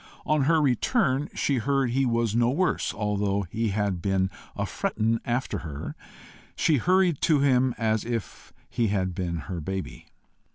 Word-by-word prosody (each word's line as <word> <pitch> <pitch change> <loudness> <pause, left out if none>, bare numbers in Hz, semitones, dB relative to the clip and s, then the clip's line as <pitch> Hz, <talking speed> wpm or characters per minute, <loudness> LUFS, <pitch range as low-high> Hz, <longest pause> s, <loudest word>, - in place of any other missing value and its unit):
On 150 -3 +2
her 160 +2 +4
return 145 - +1
she 140 - +1
heard 135 0 +1
he 135 +1 +2
was 115 -2 +1
no 120 +1 +3
worse, 175 +7 0
although 100 -1 -1
he 115 +1 -1
had 100 -3 -1
"been 95 -1 +1 0.2
a - - -1
frettin' 115 +1 -1
after 120 +2 -1
her." 75 -3 -6 0.6
She 155 -3 +3
hurried 180 +2 +2
to 150 -4 +3
him 130 -2 +3
as 110 -2 +1
if 115 -3 -5 0.2
he 120 -2 0
had 95 -3 0
been 85 -3 -3
her 90 -3 -5
baby. 95 +4 -5
115 Hz, 160 wpm, -26 LUFS, 100-135 Hz, 0.6 s, her